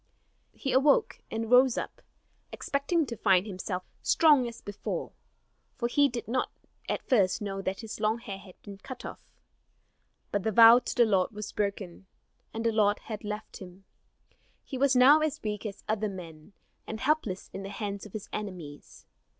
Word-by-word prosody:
He 270 - -3
awoke, 295 - +3
and 225 +1 -4
rose 250 0 +6
up, - - -5 0.5
expecting 300 +3 0
to 240 - -6
find 190 -3 +3
himself 185 -2 -4 0.2
strong 295 -7 +4
as 235 - -8
before; 205 0 -5 0.6
for 235 - -1
he 285 +3 +3
did 235 -1 -6
not 250 +3 0 0.4
at - - -3
first 200 -7 +3
know 195 -2 -4
that 190 +2 -3
his 225 -1 -7
long 215 +1 +1
hair 200 -5 -7
had 190 -2 -16
been 200 -2 -10
cut 255 +4 -9
off. - - -7 1.1
But 205 - 0
the 220 +3 -1
vow 230 +3 +9
to - - -5
the 240 - +5
Lord 195 -3 +2
was 210 0 -7
broken, 200 -3 -4 0.4
and 225 +1 -5
the 230 - +3
Lord 210 -1 +3
had 215 -1 -8
left 210 0 -6
him. 185 0 -12 0.8
He 270 - -7
was 270 0 +3
now 270 +5 +7
as 310 -1 -1
weak 210 0 -3
as 200 -1 -9
other 215 0 0
men, 170 -1 -10 0.3
and 220 - -5
helpless 260 -10 -1
in 195 - -5
the 195 - -6
hands 200 -1 -5
of 205 - -19
his 215 - -6
enemies. 180 -9 -8
215 Hz, 175 wpm, -29 LUFS, 195-250 Hz, 1.1 s, vow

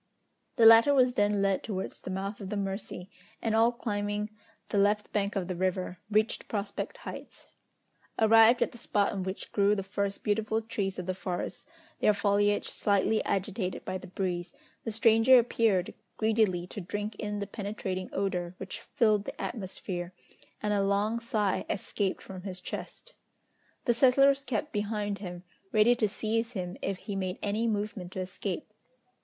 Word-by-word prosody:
The 230 - +5
latter 225 +5 +8
was 255 -2 +4
then 205 -2 +2
led 195 -1 +2
towards 190 -3 -5
the - - -7
mouth 195 +3 -4
of 190 - -6
the 210 - -2
Mercy, 195 -2 -4 0.3
and 225 - -1
all 230 +2 +5
climbing 210 -3 -2 0.4
the 205 - +1
left 210 +1 +2
bank 200 -1 0
of 190 -3 -1
the 185 - -3
river, 185 0 -1
reached 215 +2 +1
Prospect 205 - -3
Heights. - - -8 0.7
Arrived 225 +2 +6
at - - -3
the 240 - -12
spot 205 -2 +1
on 195 - -3
which 190 +1 -5
grew 205 0 +3
the 195 - -2
first 200 +1 -3
beautiful 220 +1 +1
trees 220 -4 -3
of 180 - -4
the 185 - -1
forest, 185 +5 -4 0.3
their 210 - +4
foliage 205 0 +2
slightly 205 +2 +1
agitated 195 -1 -2
by 185 - -3
the - - -11
breeze, 175 -2 -3 0.3
the 225 - -2
stranger 225 +3 +6
appeared 225 -6 +2 0.2
greedily 215 -5 +2
to 200 - -7
drink 205 +4 -4
in 210 -1 -3
the 205 - -2
penetrating 200 -3 -4
odour 180 -2 -2
which 190 - -6
filled 215 -3 +1
the - - -7
atmosphere, 185 -4 -4 0.5
and 210 0 +1
a 200 - +2
long 205 +3 +1
sigh 220 -5 0
escaped 195 -1 -2
from 185 -2 -8
his 185 -1 -5
chest. - - -7 0.7
The 240 - +4
settlers 275 +3 +5
kept 265 +5 -2
behind 205 -1 -2
him, 180 -3 -7 0.3
ready 220 +2 +5
to 215 -3 +2
seize 225 +3 -1
him 180 -3 -4
if 195 -1 -2
he 205 0 -6
made 185 -1 -2
any 215 +3 0
movement 205 -4 -2
to - - -4
escape! 185 +2 -5
205 Hz, 170 wpm, -29 LUFS, 190-220 Hz, 0.7 s, latter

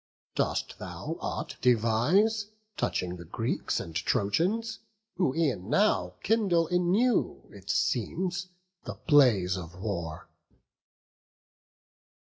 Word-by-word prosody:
dost - - -1
thou - - -5
aught - - -4
devise 125 - +3 0.3
Touching 90 0 -2
the 85 - -9
Greeks 80 - -2
and 80 - -7
Trojans? 180 - 0 0.4
who 160 -8 +1
e'en 135 - 0
now 210 +8 +2
Kindle 195 -7 +3
anew, 180 +8 +1
it - - -13
seems, 180 -1 0 0.4
the - - -6
blaze 120 - +4
of 85 -2 -7
war." 85 -6 -4
145 Hz, 95 wpm, -29 LUFS, -, 0.4 s, blaze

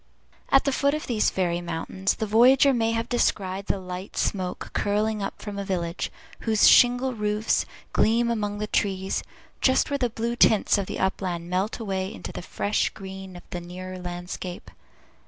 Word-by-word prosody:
At 270 - +5
the 280 - +1
foot 280 +2 +2
of 305 - -4
these 225 -4 +2
fairy 175 -2 -1
mountains, 175 +3 -2
the 220 - -2
voyager 255 +6 +6
may 230 -2 +1
have 230 +1 -1
descried 195 -5 0
the - - +1
light 185 0 -7
smoke 185 -3 -2
curling 210 +1 0
up 195 - -4
from 205 -2 -6
a - - -2
Village, 175 -3 -2 0.3
whose 220 -2 +4
shingle 245 +1 +5
roofs 210 0 0 0.3
gleam 235 +2 +3
among 205 -2 -2
the 210 - -2
trees, 195 -2 0 0.4
just 260 +2 +3
where 280 - 0
the 245 -2 +1
blue 235 +1 -2
tints 215 -3 +4
of 195 - -3
the - - -4
upland 180 -2 -2
melt 190 +4 0
away 195 -3 -3
into - - -7
the - - -6
fresh 205 +3 0
green 190 -1 -9
of 175 - -10
the 175 - -4
nearer 185 +1 -7
landscape. 175 0 -6
205 Hz, 175 wpm, -25 LUFS, 185-230 Hz, 0.4 s, voyager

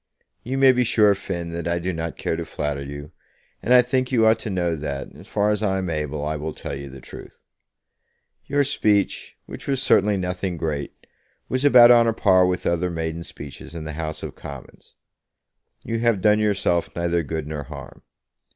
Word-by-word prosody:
You 130 +3 -3
may 135 -1 +7
be 125 -1 +2
sure, 105 -3 +4
Finn, 85 -3 -5
that 85 0 -4
I 85 0 0
do 90 +2 -2
not 80 0 -4
care - - -2
to - - -3
flatter 75 -2 -3
you, 70 +2 -8 0.5
and 120 - -2
I 125 0 +8
think 130 +1 -1
you 115 -3 +3
ought 110 0 +4
to 110 - -5
know 90 -3 0
that, 70 -3 -5
as - - -14
far 105 0 +1
as 105 0 -1
I 95 -3 +1
am 95 -2 -2
able, 75 -1 -3
I 75 0 -2
will 75 +1 -5
tell - - -6
you 70 0 -7
the 65 0 -11
truth. 65 - -12 1.1
Your 145 0 +2
speech, 105 -7 0
which - - -8
was 135 -2 +1
certainly 105 -5 +3
nothing 90 -1 -3
great, 75 -3 -4 0.4
was 130 +1 -1
about 125 -4 +8
on 120 -1 +6
a 115 - +2
par 95 -4 +4
with 90 0 -2
other 85 +1 +1
maiden 80 -1 -3
speeches 75 0 -10
in 80 - -5
the 80 0 -6
House 80 0 -5
of - - -5
Commons. - - -11 0.9
You 115 0 -2
have 115 -3 +2
done 105 +2 +4
yourself 100 -5 +1
neither 85 0 0
good 80 0 -4
nor 75 -1 -5
harm. - - -10
90 Hz, 200 wpm, -23 LUFS, 80-110 Hz, 1.1 s, I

